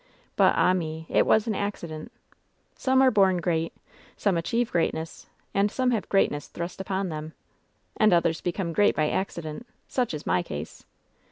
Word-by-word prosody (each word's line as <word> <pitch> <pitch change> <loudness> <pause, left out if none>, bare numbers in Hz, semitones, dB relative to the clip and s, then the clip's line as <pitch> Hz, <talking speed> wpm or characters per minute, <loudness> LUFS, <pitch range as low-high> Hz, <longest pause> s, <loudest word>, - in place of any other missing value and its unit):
But, - - +4
ah 185 - +4
me 160 -3 -3
I - - +1
It - - +4
was 220 0 +4
an 225 - -1
accident. 190 -3 -4 0.6
'Some 260 0 +2
are 260 - +6
bom 190 -3 +4
great; 165 -2 0 0.5
some 200 -3 +1
achieve 230 +8 0
greatness; 165 -1 -2 0.3
and 200 +1 +2
some 255 +3 0
have 225 -4 -1
greatness 145 -7 +1
thrust 175 +2 -6
upon 190 0 -2
them,' 155 0 -6 0.6
and 215 -1 +5
others 170 -2 +2
become 175 -1 -2
great 205 +4 +3
by 150 -1 +1
accident 170 +2 -4 0.2
Such 245 -10 -1
is 150 - -7
my 90 - +2
case." 75 -2 -7
180 Hz, 170 wpm, -26 LUFS, 160-205 Hz, 0.6 s, are